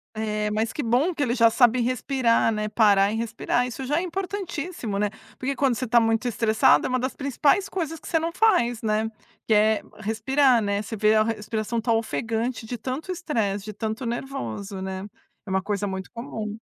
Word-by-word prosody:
É, 215 -1 -1
mas 220 +2 -1
que 300 - -3
bom 255 +10 +2
que 310 - -4
ele 245 -2 +1
já 230 -2 +6
sabe 245 +1 +4
respirar, 245 -1 +2
né, 215 -1 -2
parar 205 -2 +4
e - - -2
respirar. 230 +2 -1
Isso 255 +2 -6
já 295 +5 +1
é - - -1
importantíssimo, 360 - -4
né. 205 0 +1 0.3
Porque 275 +1 -2
quando 265 -3 +2
você 255 +2 -3
tá 235 +1 +5
muito 225 +2 +1
estressado 220 -1 +3
é - - -1
uma 255 0 +1
das 260 +2 -3
principais 280 +7 +1
coisas 325 -4 -3
que - - -12
você 330 - +2
não 330 +1 -2
faz, 335 - +2
né, 220 0 0 0.4
que 220 - +3
é 215 0 +4 0.2
respirar, 235 +4 +2
né. 200 0 0
Você 220 +1 -6
vê 215 +1 +3
a 215 - +5
respiração 220 +1 -2
tá 230 0 +1
ofegante 225 +1 -2
de 245 +2 -5
tanto 260 - -4
estresse, 220 - -2
de 215 - -6
tanto 220 +4 -4
nervoso, 200 - -4
né, 190 +1 -4 0.4
é - - -9
uma 190 0 +1
coisa 205 +1 -2
muito 190 -1 -5
comum. 225 -3 -5
230 Hz, 200 wpm, -25 LUFS, 215-265 Hz, 0.4 s, já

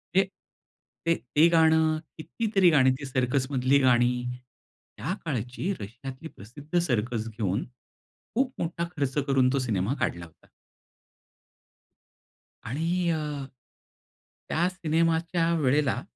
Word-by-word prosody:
हे 195 - +6 0.8
ते 165 0 +3 0.2
ते 160 +3 +7
गाणं, 160 -1 +4 0.2
कितीतरी 195 +2 +2
गाणी 130 -4 +5
ती 140 - -6
सर्कसमधली 130 +1 +1
गाणी. 125 -2 +4 0.9
त्या 135 - -2
काळची 130 - -2
रशियातली 130 +8 -8
प्रसिद्ध 145 - -4
सर्कस 115 -6 -1
घेऊन, 105 -3 -2 0.7
खूप 260 +1 +1
मोठा 170 0 -2
खर्च 140 -1 -1
करून 130 -2 +3
तो 140 - +2
सिनेमा 110 -1 0
काढला 85 0 -2
होता. 80 - -21 2.2
आणि 155 +8 -2 0.2
अ, 160 - 0 1.3
त्या 170 +3 +2
सिनेमाच्या 165 0 +1
वेळेला 135 -2 +2
140 Hz, 105 wpm, -27 LUFS, 125-165 Hz, 2.2 s, ते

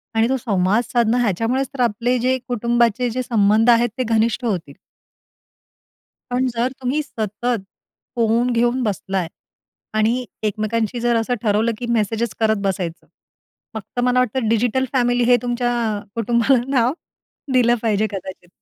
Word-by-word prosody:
आणि 225 +1 +3
तो 265 - +1
संवाद 205 -1 +1
साधणं, 235 0 +1
ह्याच्यामुळेच 235 +5 0
तर 260 - -3
आपले 240 +2 +1
जे 255 +2 +1
कुटुंबाचे 240 0 +1
जे 255 +3 -2
संबंध 220 -1 +3
आहेत, 240 0 +5
ते 255 - 0
घनिष्ठ 230 +1 +1
होतील. 175 -10 -3 1.6
पण 250 +1 +1
जर 240 +2 0
तुम्ही 260 +5 0
सतत 225 -2 -3 0.5
फोन 235 +1 +2
घेऊन 240 +2 +1
बसला 195 -3 -2
आहे 180 -3 -1 0.7
आणि 235 +4 +1 0.2
एकमेकांशी 215 +2 -1
जर 240 0 +1
असं 230 +2 0
ठरवलं, 215 +1 +2
की 245 - -5
मेसेज 225 0 0
करत 220 -1 +2
बसायचं, 180 -4 -3 0.7
फक्त 220 +3 -6
मला 250 0 +3
वाटतं 250 -1 0
डिजिटल 240 +3 +1
फॅमिली 245 -1 +2
हे 245 0 +5
तुमच्या 245 0 -1 0.4
कुटुंबाला 235 +3 +2
नाव 255 -2 +2 0.6
दिलं 240 -1 +4
पाहिजे 220 -1 +1
कदाचित. 190 -2 -7
235 Hz, 140 wpm, -20 LUFS, 215-245 Hz, 1.6 s, आहेत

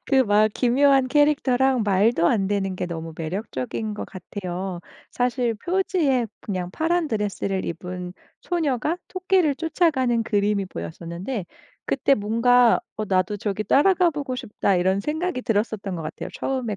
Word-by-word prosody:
그 270 - +2
막 210 +1 +4
기묘한 265 +2 +3
캐릭터랑 265 -4 +3
말도 200 -2 +3
안 195 -1 +2
되는 195 -2 -1
게 - - -2
너무 165 -2 -6
매력적인 190 - -4
것 205 - -5
같아요. 185 -1 -6 0.3
사실 245 -1 0
표지에 315 - 0 0.2
그냥 185 -3 -3
파란 325 - 0
드레스를 200 -3 -2
입은 180 +1 -5 0.3
소녀가 315 -2 -1
토끼를 370 -5 +1
쫓아가는 290 -7 +1
그림이 205 -2 0
보였었는데 170 - -6 0.4
그때 275 +1 +3
뭔가 230 +4 +4 0.2
'어 215 - -2
나도 185 +2 +1
저기 210 0 -2
따라 335 - +4
가 360 -1 +3
보고 285 -4 -4
싶다.' 205 -5 0
이런 190 +2 +2
생각이 315 - -2
들었었던 205 -3 -1
것 165 - -5
같아요, 155 0 -6
처음에 250 -6 -2
220 Hz, 320 characters per minute, -23 LUFS, 190-275 Hz, 0.4 s, 막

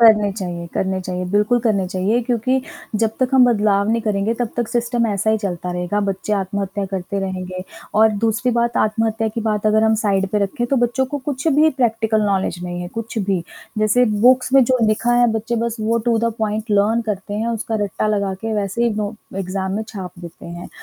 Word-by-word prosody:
करने 215 -3 +6
चाहिए, 175 -4 -5
करने 190 0 -1
चाहिए, 180 0 -4
बिल्कुल 210 +4 +3
करने 210 -5 +1
चाहिए, 195 +6 +1
क्योंकि 250 +2 +1 0.4
जब 220 - +3
तक 255 - +3
हम 255 -1 +7
बदलाव 210 -3 +2
नहीं 230 +1 +2
करेंगे 210 +1 0
तब 240 - +1
तक 240 -2 -1
सिस्टम 240 0 0
ऐसा 205 +1 0
ही 220 - +2
चलता 180 -1 -3
रहेगा। 180 +3 -1
बच्चे 195 +2 -2
आत्महत्या 195 0 -2
करते 195 +1 -3
रहेंगे 185 -1 -4 0.4
और 220 0 +6
दूसरी 225 +3 +1
बात 235 0 +1
आत्महत्या 220 +1 +1
की 225 +2 -4
बात 215 -1 0
अगर 220 +1 +4
हम 220 0 +4
साइड 195 -3 +1
पे 210 - +3
रखें, 205 +4 -1
तो 275 - +1
बच्चों 260 +2 0
को 290 - -1
कुछ 270 +1 -3
भी 315 +1 +6
प्रैक्टिकल 220 -2 +2
नॉलेज 190 -3 0
नहीं 175 0 -4
है, 175 - -5
कुछ 225 +2 -5
भी। 195 -4 0 0.4
जैसे 215 +4 +4 0.2
बुक्स 255 0 +4
में 270 -1 +7
जो 255 +1 +2
लिखा 225 +3 +1
है, 240 0 +5
बच्चे 225 +2 -2
बस 235 -1 -2
वो 230 +2 +1
टू-द-पॉइंट 220 -1 0
लर्न 210 +3 +3
करते 205 0 -3
हैं 225 +2 -1
उसका 225 -1 -2
रट्टा 205 +2 -2
लगा 200 -2 0
के 225 0 -3
वैसे 205 +2 -1
ही 235 - +2
नो 210 0 -2 0.2
एग्ज़ाम 190 0 -2
में 220 - -1
छाप 190 -4 -6
देते 170 -1 -10
हैं। 175 +1 -8
215 Hz, 205 wpm, -20 LUFS, 195-230 Hz, 0.4 s, हम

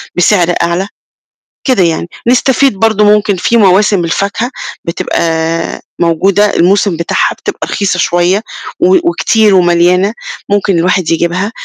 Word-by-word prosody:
بسعر 180 -1 +2
أعلى، 170 +3 -1 0.8
كده 250 -9 +2
يعني، 170 0 -1 0.2
نستفيد 260 +1 +2
برضه 220 -2 +2
ممكن 210 -1 +2
في 235 +6 0
مواسم 200 -2 +3
الفاكهة 200 +8 -2 0.3
بتبقى 165 0 -2 0.2
موجودة 195 +5 +1
الموسم 190 0 +2
بتاعها 170 - -1
بتبقى - - -6
رخيصة 190 -3 -2
شوية 175 +4 +1 0.4
و 370 +2 +3
وكتير 220 - +2
ومَليانة، 180 +3 +2 0.4
ممكن 200 -3 +1
الواحد 180 0 0
يجيبها، 175 +5 -1
190 Hz, 120 wpm, -11 LUFS, 170-210 Hz, 0.8 s, مواسم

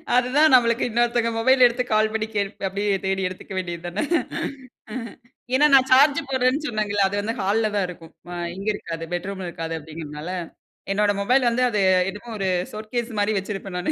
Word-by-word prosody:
அதுதான் 260 +5 +4
நம்மளுக்கு 235 -1 +4
இன்னொருத்தங்க 240 0 +1
மொபைல 255 +2 +5
எடுத்து 240 +1 -2
கால் 215 0 +3
பண்ணி, 220 0 -1
கேள் 200 -1 0 0.2
அப்படியே 200 +1 0
தேடி 190 0 0
எடுத்துக்கவேண்டியது 180 -2 -6
தான. 180 +4 -2 1.5
ஏன்னா, 290 +3 +5
"நான் 265 -1 +6
சார்ஜ் 280 +2 +6
போடுறேன்னு 260 +3 +1
சொன்னேங்கல்ல. 205 -4 0
அது 195 - -4
வந்து 220 +2 -2
ஹால்ல 215 +3 +1
தான் 200 -2 +1
இருக்கும். 165 -2 -11 0.2
ஆ - - -5 0.2
இங்க 195 +2 -7
இருக்காது, 165 -4 -6
பெட்ரூம்ல 190 +1 -4
இருக்காது." 165 -1 -5
அப்படீங்குறதுனால, 155 0 -8 0.6
என்னோட 205 +1 +2
மொபைல் 250 +5 +3
வந்து 250 +2 +1
அது 210 -3 -1 0.3
என்னமோ 210 +4 -8
ஒரு 190 -1 0 0.2
ஷோகேஸ் 225 +3 -4
மாரி 205 +1 +2
வச்சுருப்பேன் 195 -1 -4
நானு. 180 - -1
210 Hz, 165 wpm, -23 LUFS, 190-240 Hz, 1.5 s, நான்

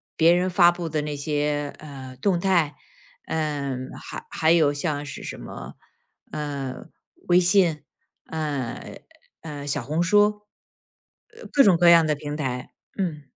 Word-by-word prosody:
别 165 +1 +5
人 180 +1 +1
发 175 -1 +6
布 175 -1 -5
的 155 -1 -1
那 150 -1 -3
些， 145 0 -1
呃， 135 -4 -10
动 185 +2 +1
态， 170 -5 +2 0.5
呃， 145 -4 -2 0.2
还 - - -8
还 160 0 +2
有 155 -4 +4
像 145 0 -2
是 135 - -7
什 - - -6
么， - - -9 0.6
呃， 140 -3 -5 0.4
微 175 0 +6
信， 180 -4 +3 0.4
呃， 145 -7 -4 0.4
呃， 145 -3 -7
小 145 -2 -1
红 155 +7 -1
书。 210 +3 +3 0.9
呃， 470 - -11
各 280 - +6
种 190 -7 +5
各 175 0 +6
样 170 -1 +7
的 155 - +2
平 145 0 -5
台， 125 -4 -4 0.2
嗯。 165 -7 -2
155 Hz, 155 characters per minute, -24 LUFS, 145-175 Hz, 0.9 s, 样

